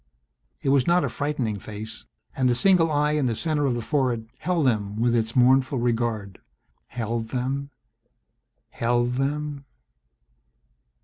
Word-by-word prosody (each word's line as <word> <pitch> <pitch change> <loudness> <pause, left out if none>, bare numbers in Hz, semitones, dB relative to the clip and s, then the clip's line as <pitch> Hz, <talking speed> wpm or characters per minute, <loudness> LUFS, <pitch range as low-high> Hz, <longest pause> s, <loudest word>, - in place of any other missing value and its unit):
It - - +1
was 135 -2 +3
not 175 +1 +4
a - - 0
frightening 135 -8 -2
face 110 +2 -7 0.3
and 130 -2 +2
the 120 - +2
single 175 +3 +4
eye 150 0 +2
in 150 -3 +1
the 115 - 0
center 150 +1 0
of 125 - 0
the 120 - -3
forehead 125 -6 -1
held 170 -2 0
them 105 -5 0
with 120 +2 +1
its 115 0 -1
mournful 130 +2 +4
regard, 115 -5 -1 0.5
held 115 -1 -3
them, 135 +3 -2 1.0
held 120 +1 +1
them 145 +1 -2
125 Hz, 140 wpm, -25 LUFS, 115-145 Hz, 1.0 s, not